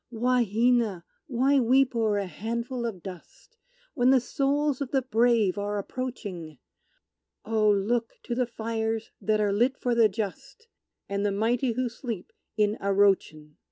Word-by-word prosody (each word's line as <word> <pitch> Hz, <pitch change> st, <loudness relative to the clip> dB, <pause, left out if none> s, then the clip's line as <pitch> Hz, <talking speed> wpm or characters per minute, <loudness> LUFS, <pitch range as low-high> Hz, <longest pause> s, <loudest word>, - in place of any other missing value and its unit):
"Wahina, 235 Hz, -4 st, +1 dB, 0.2 s
why 270 Hz, +3 st, +2 dB
weep 260 Hz, +1 st, +3 dB
o'er 220 Hz, -3 st, +1 dB
a 200 Hz, -, -1 dB
handful 235 Hz, +5 st, -4 dB
of 190 Hz, -7 st, -7 dB
dust, 190 Hz, -, -11 dB, 0.4 s
When 250 Hz, -3 st, +3 dB
the 265 Hz, 0 st, +6 dB
souls 280 Hz, +3 st, 0 dB
of 275 Hz, -, -2 dB
the 265 Hz, -1 st, +1 dB
brave 230 Hz, -5 st, +2 dB
are 205 Hz, 0 st, -2 dB
approaching? 200 Hz, -, -6 dB, 0.9 s
Oh, 215 Hz, -1 st, +2 dB
look 220 Hz, +4 st, +1 dB
to 240 Hz, -, -4 dB
the 250 Hz, 0 st, 0 dB
fires 225 Hz, -1 st, -3 dB
that 215 Hz, 0 st, +1 dB
are 205 Hz, -1 st, +1 dB
lit 245 Hz, +6 st, +2 dB
for 245 Hz, -, -1 dB
the 230 Hz, -2 st, +5 dB
just, 225 Hz, -, -6 dB, 0.4 s
And 200 Hz, 0 st, -2 dB
the 205 Hz, -, +1 dB
mighty 230 Hz, +5 st, 0 dB
who 255 Hz, +2 st, -1 dB
sleep 230 Hz, -4 st, -6 dB, 0.2 s
in 210 Hz, 0 st, +2 dB
Arrochin!" 195 Hz, -7 st, +1 dB
230 Hz, 150 wpm, -27 LUFS, 205-250 Hz, 0.9 s, the